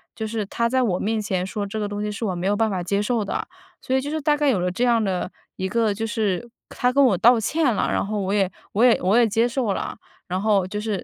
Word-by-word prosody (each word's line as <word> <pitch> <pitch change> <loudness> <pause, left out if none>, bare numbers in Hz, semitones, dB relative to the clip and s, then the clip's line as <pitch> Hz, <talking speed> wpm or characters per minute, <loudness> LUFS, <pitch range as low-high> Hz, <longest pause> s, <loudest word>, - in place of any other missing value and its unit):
就 220 -1 -4
是 215 -1 -3
他 235 +4 -1
在 260 +1 +2
我 185 -6 0
面 220 +1 -1
前 195 -4 -1
说 205 +1 -3
这 210 +2 -5
个 210 - -1
东 205 0 -4
西 210 - -2
是 205 - -6
我 190 -4 -1
没 175 +1 -4
有 205 +1 +2
办 220 +1 +1
法 185 -3 -2
接 200 +3 0
受 220 0 0
的。 - - -3 0.3
所 260 - -1
以 265 - +2
就 290 +2 -5
是 315 -1 -2
大 295 +1 +2
概 295 - +1
有 205 -8 +2
了 180 - 0
这 235 +7 -2
样 235 -2 +3
的 185 -1 -2 0.2
一 190 - -2
个 225 +1 +1
就 220 +3 -3
是 215 0 -1 0.2
她 250 0 0
跟 280 0 +5
我 215 -8 +4
道 235 +4 +5
歉 285 +3 +1
了， - - 0
然 - - 0
后 210 +1 -2
我 190 +1 -2
也 195 -2 +1 0.2
我 220 +4 +2
也 245 - +5
我 190 +5 +3
也 240 -2 +5
接 225 +3 +2
受 240 -4 -1
了， - - -4 0.3
然 185 +1 -2
后 200 -3 +2
就 210 +2 -4
是 210 -3 -3
215 Hz, 310 characters per minute, -23 LUFS, 195-235 Hz, 0.3 s, 跟